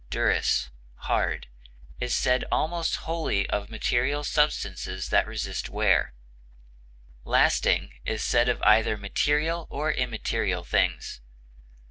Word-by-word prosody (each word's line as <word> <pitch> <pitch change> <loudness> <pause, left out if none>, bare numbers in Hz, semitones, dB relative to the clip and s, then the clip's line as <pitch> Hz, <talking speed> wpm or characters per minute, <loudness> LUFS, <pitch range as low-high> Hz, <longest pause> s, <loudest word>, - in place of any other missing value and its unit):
durus, 65 +1 +1 0.2
hard) - - -1 0.5
is 125 0 -1
said 125 0 +2
almost 165 +1 0
wholly 160 -12 -1
of 100 -1 -2
material 125 +6 0
substances 150 0 -1
that - - +3
resist - - -4
wear; 60 - +1 1.1
lasting - - +2
is 110 - -2
said 120 +1 +2
of 125 - 0
either 110 0 +4
material 150 +11 0
or 155 +2 -1
immaterial 125 -5 -2
things. - - -1
125 Hz, 105 wpm, -26 LUFS, 110-150 Hz, 1.1 s, either